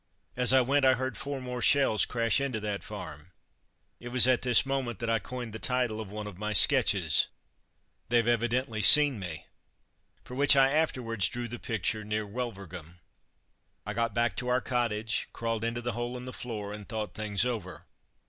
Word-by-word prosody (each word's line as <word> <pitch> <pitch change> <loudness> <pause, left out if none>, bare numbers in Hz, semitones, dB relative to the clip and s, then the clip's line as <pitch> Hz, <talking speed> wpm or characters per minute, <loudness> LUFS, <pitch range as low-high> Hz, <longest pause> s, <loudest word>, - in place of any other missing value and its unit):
As 125 0 +3
I 130 0 +5
went 140 +3 +1
I 130 -1 +5
heard 130 +1 -4
four 140 -1 -5
more 125 -1 -6
shells 135 -1 +3
crash 115 +1 +1
into 130 -5 -2
that 105 -1 -4
farm. 85 -4 -9 0.7
It 120 - -10
was 125 0 +5
at 130 -1 +3
this 125 +3 +3
moment 135 -5 -3
that 115 +2 -3
I 115 - +1
coined 120 +1 -7
the 110 - -6
title 125 -3 -1
of 105 - -8
one 105 +1 -7
of 100 -3 -10
my 105 0 -3
sketches, - - +4 0.8
"They've 120 -1 +2
evidently 120 -1 0
seen 145 +2 +7
me," 90 -5 -7 0.8
for - - -11
which 140 +2 +4
I 135 0 +4
afterwards 115 -10 0
drew 120 0 -5
the 120 +1 -7
picture 110 0 -3
near 105 0 -3
Wulverghem. 95 -7 -7 0.9
I - - -4
got 115 -3 -2
back 120 -3 0
to 125 - -3
our 125 0 +2
cottage, 115 -3 -2
crawled 115 -1 -3
into 115 +1 -2
the 120 0 -3
hole 120 +1 -4
in 125 - -9
the 130 - -8
floor, 105 -4 -6
and 105 -1 -10
thought 110 -2 -5
things 105 0 -1
over. 95 -10 -5
115 Hz, 185 wpm, -28 LUFS, 105-125 Hz, 0.9 s, seen